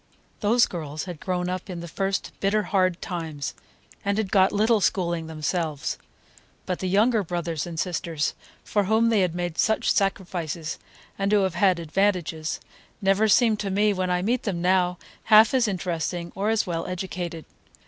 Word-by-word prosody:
Those 235 +3 +4
girls 155 -3 -5
had 180 -5 -7
grown 180 -1 -2
up 185 +2 -4
in 180 -2 -5
the 170 - -7
first 195 +4 -2
bitter 210 +2 +1
hard 185 -3 +1
times, 160 -6 -4 0.5
and 200 +1 0
had 215 -3 -1
got 190 -1 +5
little 215 +1 +3
schooling 170 -4 0
themselves. 155 -2 -2 0.7
But 180 - -2
the 185 - -2
younger 215 +4 +3
brothers 170 -2 -3
and 165 -2 -5
sisters, 170 -4 -1 0.3
for 205 -2 0
whom 220 +3 +3
they 205 -5 +3
made 175 -1 -4
such 220 - +2
sacrifices 175 -5 -2 0.4
and 195 +1 +1
who 205 -2 +4
have 190 -3 0
had 190 -2 +3
"advantages," 170 -2 -1 0.4
never 195 +1 +3
seem 220 0 +4
to 205 -1 -3
me, 205 +2 +2
when 185 -1 -1
I 180 0 +1
meet 240 +4 +1
them 190 -5 -2
now, 180 0 +2 0.3
half 220 +1 +7
as 250 -3 +3
interesting 175 -2 -3
or 200 +3 -1
as 225 -1 +2
well 165 -3 -3
educated. 175 -3 -5
185 Hz, 170 wpm, -25 LUFS, 170-205 Hz, 0.7 s, half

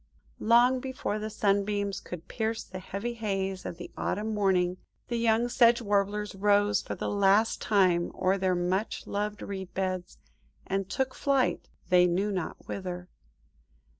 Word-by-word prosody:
Long 240 +3 +5
before 255 -5 -3
the 215 +1 -4
sunbeams 200 -1 0
could 175 -2 -9
pierce 225 -1 -2
the 185 0 -8
heavy 200 +5 -4
haze 195 -4 -2
of 170 - -6
the 175 - -8
next - - -10
autumn 215 +2 -1
morning, 185 -3 +2 0.3
the 240 - -1
young 230 0 +2
Sedge 235 -1 +5
Warblers 205 -1 0
rose 205 +1 +3
for - - -5
the - - -4
last 200 +2 +3
time 185 -5 +3
o'er 190 +1 +1
their 185 -1 +2
much 185 +4 -1
loved 210 0 -3
reed 190 -2 -6
beds, 185 -1 -2 0.5
and 195 0 -2
took 265 -1 -1
flight–"they 250 -9 +1
knew 190 +4 0
not 185 -5 -4
whither." 180 -2 -5
200 Hz, 150 wpm, -29 LUFS, 185-220 Hz, 0.5 s, Long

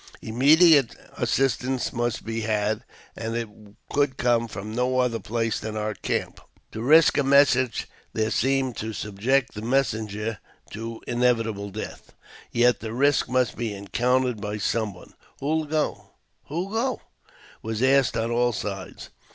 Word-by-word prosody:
Immediate 145 +4 +5 0.2
assistance 130 -1 0
must 120 0 -2
be 115 0 -3
had, 105 0 0 0.3
and 115 0 -4
it 115 -1 -2 0.4
could 140 -2 +1
come 120 -1 +2
from 105 0 -7
no 125 +2 0
other 125 -3 +1
place 115 0 -1
than 110 -1 -5
our 105 0 -2
camp. - - -3 0.3
To 110 - -6
risk 155 +6 +5
a - - +3
message 135 -2 +3 0.2
there 110 0 -1
seemed 135 -1 +1
to 110 +1 -4
subject 115 +7 0
the 105 - -6
messenger 110 -4 -1 0.3
to 115 +1 -7
inevitable 115 -4 0
death; 105 +3 -8 0.4
yet 120 -1 +3
the 110 -1 -6
risk 140 +3 +2
must 125 -3 0
he 115 -3 -2
encountered 120 +4 0
by 105 +1 -3
some 105 -1 -1
one. 90 - -15
" - - -31
Who'll 155 +3 0
go? 155 +1 -2 0.3
who'll 170 +7 -3
go? 235 +4 -1 0.3
" - - -24
was 110 +2 -3
asked 135 -1 +3
on 115 +1 -1
all 120 0 +2
sides. 100 -2 -6
120 Hz, 150 wpm, -25 LUFS, 110-130 Hz, 0.4 s, Immediate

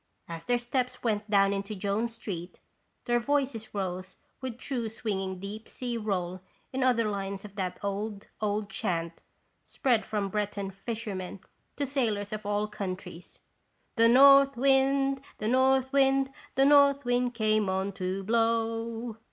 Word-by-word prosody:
As 165 -1 -7
their 245 - +2
steps 250 +1 -2
went 215 -2 -1
down 200 -1 +4
into 200 +2 -3
Jones 205 +4 -1
street 185 -6 -6 0.5
their 240 0 +2
voices 265 -4 -1
rose 185 -1 -4 0.2
with 255 -3 -5
true 245 -3 -3
swinging 195 -4 -3
deep 205 +3 -7
sea 245 -2 -4
roll 185 -5 -2 0.3
in 265 - -1
other 245 -3 +3
lines 195 -1 -4
of 200 - -10
that 185 -3 -3
old, 200 +1 -3 0.2
old 210 0 0
chant 170 -3 -2 0.4
spread 240 -5 +1
from 210 -2 -2
Breton 200 -1 -2
fishermen 195 -2 -5 0.3
to 285 - -1
sailors 220 -7 -1
of 215 -1 -5
all 205 +1 0
coun 200 -3 -3
tries: 180 -2 -12 0.3
" - - -44
The 230 -1 +5
north 275 +1 +7
wind, 270 +1 +3 0.2
the 215 - -3
north 265 +2 +3
wind, 270 -1 +3 0.2
The 270 - +4
north 280 -1 +5
wind 245 0 +1
came 215 -3 +2
on 190 +1 -1
to 190 0 -3
blow." 230 +1 0
215 Hz, 150 wpm, -29 LUFS, 195-250 Hz, 0.5 s, north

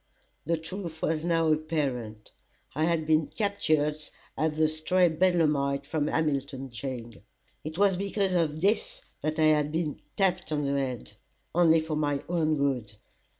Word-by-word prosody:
The 165 +2 +1
truth 165 -1 -6
was 160 -1 0
now 165 -2 +2
apparent. 135 -9 -3 0.4
I 155 +3 +1
had 165 -2 +1
been 155 -1 +3
captured 155 -8 0 0.4
as 155 -1 0
the 155 0 +4
stray 170 +3 +2
bedlamite 155 -5 +2
from 150 -2 -1
Hamilton 140 -4 -1
jail. 120 0 -5 0.5
It 155 +2 -6
was 195 -2 +3
because 195 0 0
of 155 -3 0
this - - +1 0.2
that 155 +1 -2
I 160 - +3
had 150 -1 0
been 160 -2 -2 0.2
"tapped 190 -5 +1
on 150 -1 0
the 140 - 0
head 130 -6 -2 0.4
only 165 -1 +5
for 155 -1 -3
my 145 -2 0
own 160 -3 +1
good." 130 -7 -1
155 Hz, 150 wpm, -28 LUFS, 145-170 Hz, 0.5 s, only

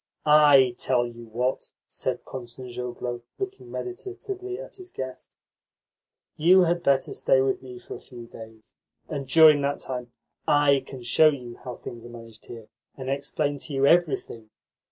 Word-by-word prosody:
"I 145 -4 +6
tell 125 -2 +2
you 120 -1 -10
what," 125 +4 -2
said - - -4
Kostanzhoglo, 125 -1 -6 0.2
looking 390 0 -6
meditatively 375 0 -6
at - - -9
his 370 -1 -10
guest. 130 - -8 1.0
"You 180 +4 +6
had 175 0 +2
better 135 -3 +2
stay 130 - +3
with 130 0 +1
me 125 -1 -10
for 120 - -10
a - - -8
few 120 -2 -11
days, 110 -1 -13 0.3
and 140 -3 -5
during 155 0 +7
that 140 0 0
time 125 -2 -6 0.4
I 145 -1 +4
can 130 -3 -9
show 155 +6 +5
you 125 -5 -6
how 125 -1 -7
things 120 -1 -9
are - - -12
managed 115 -2 -12
here, 115 -2 -10 0.3
and 130 0 -4
explain 140 +1 -1
to 145 - -5
you 135 0 +3
everything. 140 -9 +1
135 Hz, 155 wpm, -26 LUFS, 120-150 Hz, 1.0 s, during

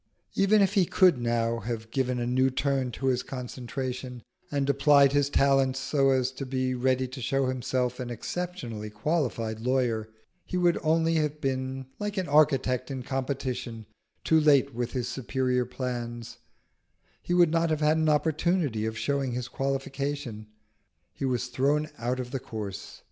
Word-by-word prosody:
Even 200 +1 +4
if 195 - +1
he 195 -3 +4
could 180 -8 +4
now 115 0 0
have 115 0 -5
given 130 -1 0
a 120 - -1
new 130 +2 +2
turn 135 -1 0
to 130 +3 -6
his 130 -2 +2
concentration, 125 -1 -5 0.3
and 140 -1 0
applied 140 0 +5
his 145 -1 +2
talents 135 -2 +3
so 135 0 +2
as 130 -1 +2
to 135 - -6
be 130 -1 -1
ready 130 +1 +1
to 130 +1 -8
show 135 +3 +1
himself 125 -1 -1
an 125 -1 -4
exceptionally 120 - -5
qualified 115 -2 -1
lawyer, 120 -3 0 0.3
he 180 - -4
would 175 -1 +3
only 165 +1 +2
have 150 -1 -1
been 130 -1 -2
like 210 0 -3
an 185 -3 -1
architect 135 -4 +3
in 130 -2 -4
competition, 130 -3 -3 0.4
too 160 - +4
late 140 -3 +4
with 120 +1 -3
his 125 -2 -2
superior 125 0 -1
plans; 120 -3 -5 0.8
he 175 - -1
would 175 -3 +5
not 165 0 +2
have 155 -1 0
had 155 +1 +3
an 160 -1 +2
opportunity 155 - +1
of 110 0 -4
showing 140 -1 -1
his 125 0 -3
qualification. 135 -3 -3 0.7
He 135 - -4
was 125 -2 0
thrown 140 +5 +1
out 125 +2 -1
of 125 -1 -5
the 135 - -2
course. 105 -4 -7
130 Hz, 165 wpm, -28 LUFS, 125-145 Hz, 0.8 s, applied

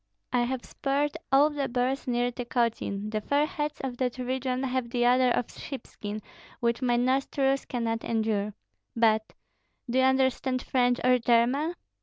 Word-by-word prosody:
I 245 - +3
have 255 0 -3
speared 285 +1 -1 0.2
all 285 +3 +5
the 285 -2 -2
bears 255 +2 -1
near 245 0 +1
Tykotsin; 230 -4 -2
the 215 -1 -1
fair 285 +7 +2
heads 300 -1 -3
of 255 -2 -4
that 250 -1 -1
region 255 0 -2
have 255 -2 -1
the 240 0 +1
odor 250 +1 +5
of 240 0 0
sheepskin, 215 -6 -7 0.4
which 235 +1 0
my 245 -2 +2
nostrils 270 +2 +1
cannot 230 -2 -2
endure. 215 -2 -1 0.4
But 220 -1 +2 0.5
Do 250 +2 +1
you 260 - +5
understand 260 -1 +1
French 245 -1 +2
or 255 0 +4
German?" 250 +8 +2
250 Hz, 155 wpm, -28 LUFS, 235-265 Hz, 0.5 s, all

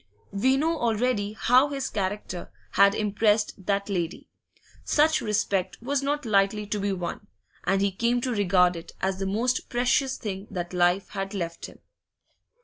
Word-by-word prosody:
We 260 +7 +2
know 320 +3 0
already 225 -2 0
how 250 +5 +4
his 275 -1 -3
character 195 -3 -4 0.2
had 200 0 +5
impressed 210 -2 +1
that 200 -1 0
lady; 180 -4 -3 0.5
such 310 +1 +3
respect 195 -3 -1
was 275 +3 -1
not 290 0 -1
lightly 210 0 +2
to 205 0 -3
be 200 0 0
won, 185 +2 -5 0.4
and 195 0 +2
he 200 - +2
came 235 +5 +1
to 255 - -1
regard 180 -4 +3
it 165 - -9
as 190 0 -1
the 195 - -2
most 240 +6 0
precious 260 +2 +1
thing 195 -1 -5
that 175 -2 -5
life 180 +2 +2
had 195 +1 -4
left 170 -3 -4
him. - - -16
205 Hz, 160 wpm, -26 LUFS, 190-245 Hz, 0.5 s, had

